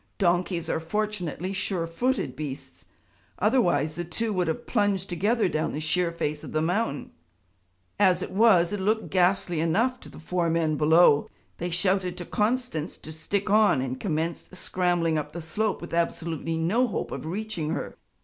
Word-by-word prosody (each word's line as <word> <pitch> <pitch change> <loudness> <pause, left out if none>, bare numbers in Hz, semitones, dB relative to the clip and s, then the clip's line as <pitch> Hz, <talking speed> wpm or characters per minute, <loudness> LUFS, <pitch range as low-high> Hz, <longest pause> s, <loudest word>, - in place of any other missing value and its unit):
Donkeys 175 -2 +1
are 160 - 0
fortunately 185 0 -2
sure 190 -3 -1
footed 190 - -1
beasts; 130 - -7 0.5
otherwise 175 - +2
the 175 - -4
two 210 +6 -2
would 180 -3 0
have 160 - -2
plunged 205 -4 +1
together 210 +6 +1
down 155 -2 -1
the 150 - -3
sheer 170 +2 +1
face 150 -3 -3
of - - -8
the 155 - +2
mountain. 175 -3 -1 0.9
As 185 -3 +4
it - - -6
was 195 -4 +4
it 205 - -2
looked 215 +3 0
ghastly 180 -2 +2
enough 225 +11 +1
to - - -12
the - - -13
four 170 +2 -1
men 160 -2 +1
below; 155 0 +5 0.3
they 175 - -2
shouted 180 +1 +1
to 175 - -5
Constance 215 -7 -1
to 155 - -10
stick 190 +6 -2
on, 210 -8 +5
and 130 0 -3
commenced 165 +2 -3
scrambling 175 -3 +1
up 150 0 -6
the 170 - -5
slope 210 +6 -1
with 170 - -8
absolutely 165 -1 -1
no 205 +11 +2
hope 205 - -3
of - - -5
reaching 200 -3 -3
her. - - -3
175 Hz, 170 wpm, -26 LUFS, 160-205 Hz, 0.9 s, below